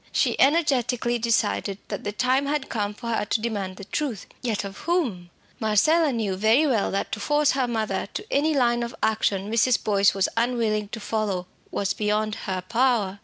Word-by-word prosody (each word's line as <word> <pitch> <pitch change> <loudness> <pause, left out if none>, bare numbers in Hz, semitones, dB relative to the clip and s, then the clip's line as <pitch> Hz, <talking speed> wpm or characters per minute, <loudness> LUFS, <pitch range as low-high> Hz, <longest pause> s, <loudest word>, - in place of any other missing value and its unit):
She - - +1
energetically 250 -5 +2
decided 220 -3 0
that - - -4
the 205 - -2
time 255 +6 +1
had 290 -1 -2
come 210 -2 -2
for 235 - -11
her 225 - 0
to 210 - 0
demand 205 -5 -3
the 200 - -9
truth. 250 -3 -3 0.2
Yet, 225 -5 -1
of 200 0 -8
whom? 245 - -1 0.3
Marcella 300 +9 +3
knew 215 -6 -1
very 220 +10 +4
well 240 -8 +1
that 195 - -2
to 220 - -3
force 295 +6 +2
her 265 -2 0
mother 220 -3 -2
to - - -4
any 300 +2 +2
line 240 -2 +2
of 235 0 -4
action 210 -2 0
Mrs. 235 +2 +2
Boyce 200 -1 +3
was 195 0 +2
unwilling 225 -3 0
to 225 +2 -7
follow, 205 -4 -2 0.2
was 200 - -1
beyond 215 0 0 0.2
her 185 -1 -1
power. 225 -2 +1
225 Hz, 185 wpm, -25 LUFS, 205-255 Hz, 0.3 s, very